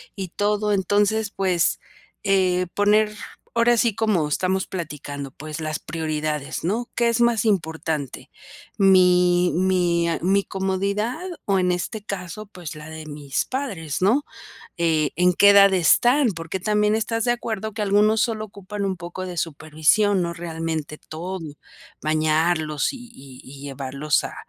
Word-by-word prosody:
y 190 Hz, -3 st, -5 dB
todo, 210 Hz, +3 st, 0 dB
entonces, 205 Hz, +2 st, +1 dB
pues, 185 Hz, -3 st, +1 dB, 0.4 s
eh, 185 Hz, -2 st, +2 dB
poner 210 Hz, +1 st, +3 dB, 0.4 s
ahora 235 Hz, +1 st, +4 dB
sí 230 Hz, -1 st, +2 dB
como 210 Hz, -8 st, +1 dB
estamos 185 Hz, +5 st, 0 dB
platicando, 145 Hz, -5 st, -6 dB
pues, 155 Hz, +3 st, -7 dB
las 155 Hz, 0 st, -2 dB
prioridades, 155 Hz, -3 st, -3 dB
¿no? 220 Hz, +8 st, -1 dB
¿Qué 235 Hz, -, +2 dB
es 235 Hz, +1 st, +1 dB
más 235 Hz, -2 st, +3 dB
importante? 160 Hz, -, -2 dB, 0.5 s
Mi 180 Hz, -2 st, +5 dB
mi 175 Hz, -2 st, +2 dB
a 165 Hz, -, 0 dB
mi 195 Hz, +2 st, +3 dB
comodidad 200 Hz, -, -2 dB, 0.2 s
o 195 Hz, -2 st, +2 dB
en 180 Hz, 0 st, +2 dB
este 200 Hz, +4 st, -3 dB
caso, 200 Hz, +1 st, -6 dB
pues 180 Hz, -6 st, -8 dB
la 150 Hz, 0 st, -10 dB
de 160 Hz, 0 st, -8 dB
mis 145 Hz, -2 st, -3 dB
padres, 195 Hz, -, -4 dB
¿no?, 240 Hz, +10 st, +3 dB, 0.5 s
eh, 160 Hz, -3 st, +1 dB
¿en 180 Hz, +1 st, +4 dB
qué 200 Hz, -, +6 dB
edad 200 Hz, -1 st, +7 dB
están? 245 Hz, -, +4 dB
Porque 165 Hz, +3 st, -5 dB
también 210 Hz, +2 st, +2 dB
estás 225 Hz, +1 st, -1 dB
de 240 Hz, -, +2 dB
acuerdo 220 Hz, -3 st, -4 dB
que 225 Hz, -, -5 dB
algunos 210 Hz, +2 st, +3 dB
solo 220 Hz, -3 st, -1 dB
ocupan 200 Hz, 0 st, -6 dB
un 190 Hz, -1 st, -1 dB
poco 175 Hz, +2 st, -6 dB
de 180 Hz, -2 st, -6 dB
supervisión, 160 Hz, +6 st, +1 dB
no 170 Hz, 0 st, -3 dB
realmente 160 Hz, -3 st, -4 dB
todo, 180 Hz, +4 st, -6 dB, 0.6 s
bañarlos 155 Hz, -1 st, +1 dB
y 245 Hz, -3 st, -11 dB
y 135 Hz, -2 st, -13 dB
y 140 Hz, +1 st, -12 dB
llevarlos 140 Hz, +1 st, -1 dB
a -, -, -6 dB
185 Hz, 150 wpm, -23 LUFS, 160-210 Hz, 0.6 s, edad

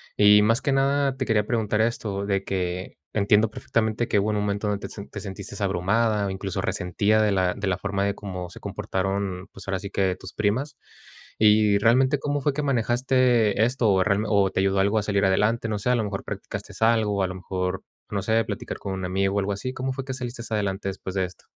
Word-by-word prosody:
Y 105 Hz, 0 st, +6 dB
más 115 Hz, +4 st, +3 dB
que 140 Hz, -, 0 dB
nada, 135 Hz, 0 st, +2 dB
te 130 Hz, -, -1 dB
quería 105 Hz, -3 st, +1 dB
preguntar 110 Hz, -2 st, +1 dB
esto, 105 Hz, -3 st, -1 dB
de 100 Hz, -1 st, 0 dB
que 90 Hz, -1 st, -3 dB, 0.2 s
entiendo 105 Hz, +1 st, +3 dB
perfectamente 110 Hz, +1 st, -1 dB
que 105 Hz, -, +2 dB
hubo 105 Hz, +2 st, 0 dB
un 105 Hz, -, 0 dB
momento 105 Hz, 0 st, -1 dB
donde 100 Hz, 0 st, -2 dB
te -, -, -11 dB
se 100 Hz, -1 st, -8 dB
te 105 Hz, -, -7 dB
sentiste 100 Hz, 0 st, -7 dB
abrumada, 100 Hz, +3 st, +1 dB
o -, -, -2 dB
incluso 95 Hz, -1 st, -3 dB
resentida 100 Hz, +4 st, +1 dB
de 105 Hz, -, +2 dB
la 95 Hz, -2 st, +1 dB
de 105 Hz, -, -4 dB
la 95 Hz, -1 st, 0 dB
forma 100 Hz, 0 st, -1 dB
de 100 Hz, -, 0 dB
cómo 90 Hz, -3 st, -6 dB
se -, -, -11 dB
comportaron, 95 Hz, -1 st, -3 dB
pues, 95 Hz, 0 st, -12 dB
ahora 95 Hz, -1 st, -1 dB
sí, 100 Hz, -, -6 dB
que 95 Hz, -2 st, 0 dB
tus 95 Hz, -, -10 dB
primas. 125 Hz, +7 st, -1 dB, 0.6 s
Y 105 Hz, -1 st, +5 dB
realmente, 130 Hz, +5 st, +3 dB
¿cómo 145 Hz, 0 st, -1 dB
fue 145 Hz, +1 st, +1 dB
que 150 Hz, -, -2 dB
manejaste 120 Hz, -4 st, +2 dB
esto? 120 Hz, -2 st, +1 dB
O 95 Hz, -1 st, +3 dB
realme 105 Hz, +1 st, +1 dB
o 100 Hz, -2 st, +3 dB
te -, -, -1 dB
ayudó 95 Hz, 0 st, +2 dB
algo 100 Hz, +3 st, +3 dB
a -, -, -2 dB
salir 100 Hz, -1 st, +1 dB
adelante, 105 Hz, +4 st, +2 dB
no 105 Hz, -2 st, -2 dB
sé, 125 Hz, -, -1 dB
a 125 Hz, -, +4 dB
lo 115 Hz, -, 0 dB
mejor 100 Hz, -2 st, -4 dB
practicaste -, -, -6 dB
algo, 110 Hz, -3 st, +3 dB
o 95 Hz, -, +1 dB
a -, -, +1 dB
lo 95 Hz, -, -5 dB
mejor, 90 Hz, 0 st, -3 dB, 0.3 s
no 100 Hz, -, -1 dB
sé, 110 Hz, +3 st, +2 dB
platicar -, -, -5 dB
con 95 Hz, -, -5 dB
un 95 Hz, -, -4 dB
amigo 95 Hz, +2 st, 0 dB
o -, -, +3 dB
algo 100 Hz, +1 st, -1 dB
así, 130 Hz, +6 st, -4 dB
¿cómo 130 Hz, 0 st, -3 dB
fue 135 Hz, 0 st, -5 dB
que 130 Hz, -, -4 dB
saliste 120 Hz, -2 st, -5 dB
adelante 100 Hz, -2 st, -1 dB
después 95 Hz, 0 st, -6 dB
de 95 Hz, -1 st, +1 dB
esto? 90 Hz, -2 st, -13 dB
105 Hz, 235 wpm, -25 LUFS, 95-115 Hz, 0.6 s, Y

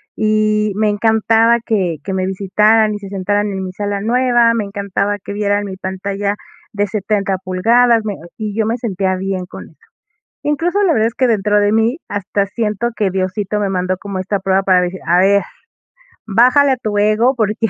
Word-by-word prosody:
y 215 Hz, -1 st, +1 dB
me 215 Hz, +1 st, +1 dB
encantaba 225 Hz, +2 st, +3 dB
que 185 Hz, -7 st, 0 dB
que 195 Hz, -, -3 dB
me 185 Hz, 0 st, -1 dB
visitaran 210 Hz, +3 st, +2 dB
y 205 Hz, -, -5 dB
se 200 Hz, -, -9 dB
sentaran 205 Hz, +2 st, -1 dB
en 190 Hz, -1 st, -4 dB
mi 185 Hz, -, -5 dB
sala 205 Hz, 0 st, -3 dB
nueva, 240 Hz, +1 st, +3 dB
me 230 Hz, -2 st, -1 dB
encantaba 200 Hz, 0 st, -2 dB
que -, -, -6 dB
vieran 205 Hz, 0 st, 0 dB
mi 190 Hz, -1 st, -6 dB
pantalla 195 Hz, +2 st, -3 dB, 0.4 s
de 205 Hz, 0 st, 0 dB
70 200 Hz, -1 st, -1 dB
pulgadas, 230 Hz, +5 st, +3 dB
me 205 Hz, -2 st, -3 dB, 0.2 s
y 215 Hz, -2 st, -4 dB
yo 220 Hz, -, +1 dB
me 225 Hz, +2 st, -1 dB
sentía 195 Hz, -5 st, -1 dB
bien 190 Hz, -1 st, -3 dB
con -, -, -10 dB
eso. -, -, -24 dB, 0.7 s
Incluso, 340 Hz, +7 st, 0 dB
la 375 Hz, -, +3 dB
verdad 220 Hz, -1 st, +2 dB
es 230 Hz, -, -6 dB
que 260 Hz, -, +2 dB
dentro 210 Hz, -2 st, +2 dB
de 205 Hz, 0 st, +2 dB
mí, 225 Hz, +5 st, +1 dB
hasta 205 Hz, 0 st, -1 dB
siento 215 Hz, +2 st, -2 dB
que 205 Hz, -2 st, +1 dB
Diosito 190 Hz, +2 st, -2 dB
me 200 Hz, -, 0 dB
mandó 185 Hz, 0 st, -1 dB
como 195 Hz, 0 st, -6 dB
esta 195 Hz, +2 st, -2 dB
prueba 190 Hz, +1 st, +1 dB
para 185 Hz, -2 st, +3 dB
decir: 180 Hz, +1 st, -3 dB
"A 175 Hz, +1 st, +4 dB
ver, 200 Hz, +2 st, +4 dB, 0.8 s
bájale 250 Hz, +7 st, +4 dB
a -, -, +1 dB
tu 215 Hz, -4 st, -3 dB
ego, 215 Hz, +5 st, +3 dB
porque, 215 Hz, -2 st, 0 dB
205 Hz, 195 wpm, -17 LUFS, 195-220 Hz, 0.8 s, A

